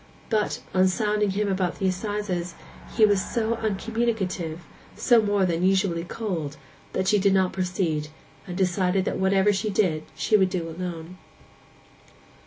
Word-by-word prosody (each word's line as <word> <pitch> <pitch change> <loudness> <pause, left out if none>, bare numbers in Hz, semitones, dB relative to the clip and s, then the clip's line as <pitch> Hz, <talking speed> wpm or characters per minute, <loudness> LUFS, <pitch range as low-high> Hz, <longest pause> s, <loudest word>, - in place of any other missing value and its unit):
But, 215 -2 0
on 185 0 +4
sounding 210 +1 +1
him 205 +2 0
about 190 -3 -1
the 195 - -2
assizes, 185 -3 -3 0.4
he 220 - +7
was 205 -2 +2
so 230 -1 -1
uncommunicative, 205 -6 -2 0.3
so 240 -2 +4
more 205 -2 +2
than 170 -1 0
usually 185 -2 +2
cold, 170 -7 -4 0.4
that 185 - -1
she 210 0 +4
did 195 0 +3
not 190 -1 +2
proceed, 180 -5 -1 0.4
and 180 -1 -5
decided 185 0 +1
that - - -2
whatever 195 +2 +3
she 205 +2 -1
did 185 -6 +1
she 215 - +2
would 190 -3 +4
do 175 -3 -3
alone. 170 +1 -6
190 Hz, 150 wpm, -25 LUFS, 180-210 Hz, 0.4 s, he